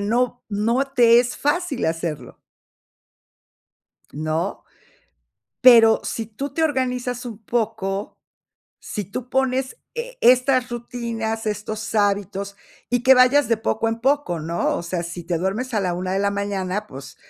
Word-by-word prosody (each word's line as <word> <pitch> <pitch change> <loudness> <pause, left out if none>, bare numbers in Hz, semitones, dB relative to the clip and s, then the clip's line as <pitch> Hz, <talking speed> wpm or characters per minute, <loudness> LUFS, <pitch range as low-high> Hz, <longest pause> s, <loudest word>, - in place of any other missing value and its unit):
no 240 +4 0
no 230 +6 +1
te 235 -1 +6
es 245 0 -3
fácil 295 - -1
hacerlo. 165 -2 -4 1.7
¿No? 155 +5 -3 1.0
Pero 230 -3 +8
si 225 - -3
tú 260 +6 -6
te 320 - 0
organizas 250 -4 -1
un 230 -4 -6
poco, 215 -3 -2 0.6
si 210 - -5
tú 235 +7 -7
pones 265 - 0 0.2
e - - -6
estas 255 +1 +4
rutinas, 230 -2 -4
estos 215 +1 -4
hábitos, 200 -1 0 0.3
y 245 -1 +1
que 265 0 +8
vayas 255 +1 +5
de 230 - +3
poco 225 +1 -1
en 225 +1 -3
poco, 270 - +1
¿no? 165 +2 -1
O - - -4
sea, 170 0 -3
si 170 +1 -6
te 170 -1 -1
duermes 215 +9 -2
a 210 - +2
la 180 -2 -1
1 185 +1 -3
de 195 - 0
la 200 0 +1
mañana, 200 0 -2
pues, 135 +1 -10
225 Hz, 145 wpm, -22 LUFS, 195-250 Hz, 1.7 s, Pero